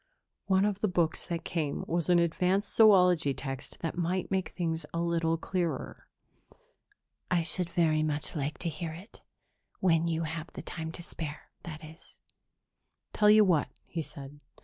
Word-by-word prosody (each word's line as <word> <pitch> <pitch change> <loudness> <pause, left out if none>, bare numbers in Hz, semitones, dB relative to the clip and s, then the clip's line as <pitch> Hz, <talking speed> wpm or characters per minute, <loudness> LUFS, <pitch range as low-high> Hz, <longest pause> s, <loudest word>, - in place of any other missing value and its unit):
"One 190 0 +4
of 205 -1 0
the 215 - +1
books 170 -4 0
that 170 -2 -3
came 155 -4 -2
was 170 0 -1
an 175 - +6
advanced 180 +4 +1
zoology 180 -9 +6
text 135 -2 -6
that 165 - -2
might 180 +2 -1
make 190 -1 0
things 165 -2 -2
a - - 0
little 165 -1 +1
clearer." 170 -4 -3 1.2
"I 175 -2 +2
should 180 +1 -2
very 160 -3 +2
much 155 +2 -2
like 150 0 -2
to - - +2
hear 160 +1 -5
it. 185 +7 -12 0.6
When 170 -2 +3
you 165 0 0
have 160 +1 -5
the - - -7
time 160 -1 -5
to 175 - -7
spare, 150 -3 -7
that 155 -2 -8
is." 160 +3 -15 1.0
"Tell 210 0 +4
you 215 0 +7
what," 170 -6 +2 0.2
he 165 - -4
said. 145 -2 -10
170 Hz, 165 wpm, -30 LUFS, 155-180 Hz, 1.2 s, you